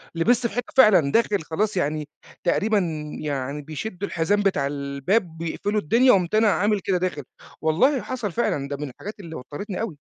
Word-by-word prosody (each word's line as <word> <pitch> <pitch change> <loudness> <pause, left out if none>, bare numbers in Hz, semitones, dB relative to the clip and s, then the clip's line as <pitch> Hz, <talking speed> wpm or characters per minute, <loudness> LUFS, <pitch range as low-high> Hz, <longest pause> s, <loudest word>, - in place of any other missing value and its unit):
لبست 235 +8 +2
في 210 - -11
حيطة 245 0 -4
فعلًا، 185 - +6
داخل 210 -2 +2
خلاص 195 +6 -1
يعني 150 -2 -1 0.4
تقريبًا 210 +4 +2 0.4
يعني 140 -1 -3
بيشدّوا 180 +6 -5
الحزام 205 +5 +1
بتاع 190 -8 +1
الباب، 145 +6 -1
بيقفلوا 200 +6 -2
الدنيا، 240 - +4
قُمت 180 0 +1
أنا 220 0 +4
عامل 205 +1 +2
كده 190 -1 0
داخل. 180 -5 -2 0.4
والله 245 - +3
حصل 240 -6 -4
فعلًا، 145 -9 -1
ده 140 0 -4
من 145 0 -5
الحاجات 205 - -9
اللي 165 -5 -8
وتّرِتني 170 +9 -6
أوي. 195 -10 -4
185 Hz, 170 wpm, -24 LUFS, 150-215 Hz, 0.4 s, فعلًا